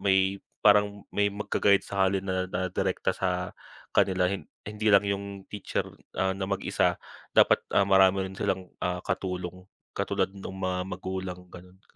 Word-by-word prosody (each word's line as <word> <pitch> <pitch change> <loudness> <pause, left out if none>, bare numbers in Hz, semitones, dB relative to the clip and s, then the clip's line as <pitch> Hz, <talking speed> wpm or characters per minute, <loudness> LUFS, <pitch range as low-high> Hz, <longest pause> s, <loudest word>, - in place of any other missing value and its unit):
may 95 0 +2 0.2
parang 105 -1 +4
may 100 0 +2
mag-ga-guide 100 -1 +2
sa 95 -1 +2
kanila 95 -1 -1
na 90 - -2
direkta - - 0
sa 90 -1 -1 0.4
kanila 95 -1 +3
hin 95 -6 -5 0.2
hindi 105 +1 -2
lang 100 0 +6
yung 100 -1 -3
teacher, 105 - -2 0.3
ah, 95 0 +2
na 95 -1 -2
mag-isa. 100 -1 +1 0.4
Dapat, - - +5
ah, 100 - +6
marami 95 0 +5
rin - - -10
silang, 95 -1 -1
ah, 90 0 -1
katulong 90 0 -3 0.3
katulad - - 0
nung 95 -1 -8
mga 95 0 -2
magulang, 95 -1 -5
ganun. 90 +2 -13
95 Hz, 150 wpm, -28 LUFS, 95-100 Hz, 0.4 s, lang